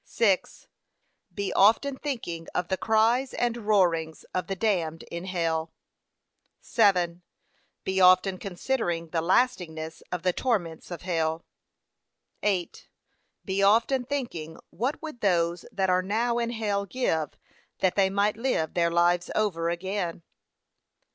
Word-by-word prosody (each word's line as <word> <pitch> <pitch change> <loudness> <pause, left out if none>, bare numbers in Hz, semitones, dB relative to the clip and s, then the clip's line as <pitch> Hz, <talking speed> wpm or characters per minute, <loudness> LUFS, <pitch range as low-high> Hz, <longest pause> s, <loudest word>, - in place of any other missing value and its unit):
6. 200 -5 0 0.6
Be 200 -1 -3
often 230 +7 +4
thinking 230 - -5
of 175 - -1
the 190 - +2
cries 225 +6 +2
and 240 -1 0
roarings 180 -8 +1
of 180 -1 -2
the 195 - -2
damned 175 -6 -1
in 170 +1 -5
hell. 165 -3 -1 0.9
7. 180 -6 +2 0.6
Be 190 0 0
often 185 +1 +5
considering 180 -4 -2
the 165 0 0
lastingness 165 -5 0
of 180 -1 -3
the 180 -1 +2
torments 175 -11 -2
of 175 -1 -7
hell. 165 -2 -1 1.0
8. 190 -4 -1 0.6
Be 190 +1 -1
often 230 +6 +4
thinking 235 - -4
what 250 - -2
would 305 -7 -7
those 175 -3 +1
that 190 -1 +1
are 180 0 +3
now 230 +5 0
in 235 0 -1
hell 205 -4 -1
give 160 - -1 0.4
that 185 - +2
they 195 -1 +3
might 200 +2 +1
live 230 -10 -1
their 170 -1 +2
lives 175 +1 +2
over 170 -6 0
again. 175 -1 -3
190 Hz, 130 wpm, -27 LUFS, 170-220 Hz, 1.0 s, often